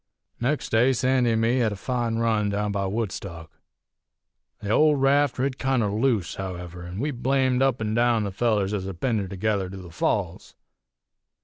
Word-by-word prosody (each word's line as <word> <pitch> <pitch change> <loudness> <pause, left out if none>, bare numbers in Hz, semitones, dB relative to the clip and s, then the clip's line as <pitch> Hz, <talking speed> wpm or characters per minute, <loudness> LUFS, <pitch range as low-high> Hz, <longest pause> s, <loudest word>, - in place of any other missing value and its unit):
"Nex' 140 +5 -1
day 120 +4 +3
Sandy 125 -1 +2
an' 110 - +1
me 115 +3 +2
hed 115 -3 +2
a - - -4
fine 120 +2 -2
run 110 -2 +1
down 105 +1 -1
by 100 -1 -1
Woodstock. 95 -6 -5 1.1
The 105 -1 -4
old 150 +3 +4
raft 140 0 +3
rid 130 +1 -1
kinder 130 -6 +1
loose, 110 -3 0
however, 90 -2 -6
an' 90 +2 -7
we 145 +4 -1
blamed 130 0 +1
up 135 -2 +2
an' 110 -1 -2
down 120 -1 +2
the 100 - -3
fellers 105 -1 0
ez 95 -3 -2
had 95 -3 -7
pinned 120 -5 0
her 100 - -3
together 100 0 -1
to 95 - -8
the 90 -2 -10
Falls. 90 +1 -2
110 Hz, 185 wpm, -25 LUFS, 100-125 Hz, 1.1 s, old